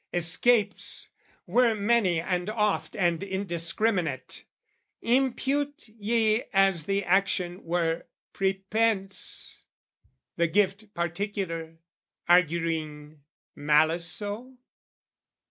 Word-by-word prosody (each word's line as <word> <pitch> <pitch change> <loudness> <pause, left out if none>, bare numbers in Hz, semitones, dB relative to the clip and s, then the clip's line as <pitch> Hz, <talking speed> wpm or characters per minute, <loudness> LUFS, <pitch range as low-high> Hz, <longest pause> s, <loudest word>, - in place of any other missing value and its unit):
escapes 205 +6 +2 0.4
Were 240 -2 +3
many 205 -5 +2
and 180 +2 -2
oft 210 -1 -1
and 175 -4 +1
indiscriminate 180 - -2 0.6
Impute 270 +3 0
ye 220 +1 +1
as 195 -5 +3
the 200 +1 0
action 185 -1 +1
were 165 -1 -1 0.3
prepense, 195 0 -1 0.8
The 170 0 +3
gift 200 +4 0
particular, 170 -2 -3 0.5
arguing 160 -3 +1 0.3
malice 155 +3 +2
so? 220 +8 -3
190 Hz, 75 wpm, -27 LUFS, 170-215 Hz, 0.8 s, Were